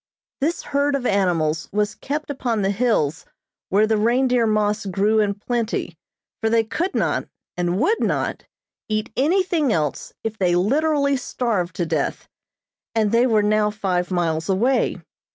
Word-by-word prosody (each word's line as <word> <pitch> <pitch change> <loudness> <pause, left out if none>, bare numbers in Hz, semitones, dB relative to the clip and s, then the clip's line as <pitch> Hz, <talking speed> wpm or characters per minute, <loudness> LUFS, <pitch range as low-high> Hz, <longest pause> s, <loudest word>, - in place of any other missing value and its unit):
This 320 +5 -1
herd 285 0 +1
of 265 -2 -3
animals 170 -7 +1
was 205 0 0
kept 295 +7 -4
upon 235 -6 -1
the 195 - +2
hills 195 - 0 0.5
where 205 +3 +4
the 220 -1 +1
reindeer 245 +1 +2
moss 210 -1 0
grew 205 +4 +2
in 205 -2 +1
plenty, 230 +2 -2 0.5
for 225 - +1
they 225 0 +3
could 330 - -3
not, - - 0 0.3
and 175 +1 -1
would 440 - +2
not, - - -1 0.5
eat 215 0 -1
anything 325 - +2
else 150 -7 -1
if 220 -1 -4
they 180 -2 +2
literally 280 - +2
starved 215 -8 -2
to 175 - -1
death, 160 -3 -2 0.7
and 215 -2 +2
they 235 +2 +4
were 215 -3 +3
now 210 0 +2
five 185 -4 -1
miles 170 -2 -1
away. 235 +8 +2
215 Hz, 155 wpm, -22 LUFS, 190-250 Hz, 0.7 s, where